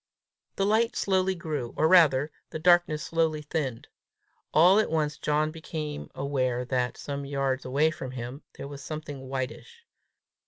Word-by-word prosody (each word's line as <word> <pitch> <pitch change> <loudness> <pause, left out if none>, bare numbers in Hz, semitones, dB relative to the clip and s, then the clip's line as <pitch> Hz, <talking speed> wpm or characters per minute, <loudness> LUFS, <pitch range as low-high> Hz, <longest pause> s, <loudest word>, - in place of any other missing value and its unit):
The 195 - +1
light 220 +3 +2
slowly 190 -1 +1
grew, 150 -8 -4
or 155 - +4
rather, 155 -5 +5 0.2
the - - -5
darkness 175 -2 +3
slowly 160 -2 0
thinned. 145 -6 -3 0.6
All 180 +6 +6
at 220 - +1
once 155 -2 0
John 150 +1 +1
became 155 -2 -6
aware 130 -3 -1
that, 125 -1 -1
some 140 0 -5
yards 135 -1 -1
away 145 +5 +2
from 130 -4 -6
him, 125 +2 -6 0.2
there - - -6
was 140 -1 -9
something 145 -3 -7
whitish. 135 - -5
150 Hz, 150 wpm, -27 LUFS, 135-165 Hz, 0.6 s, All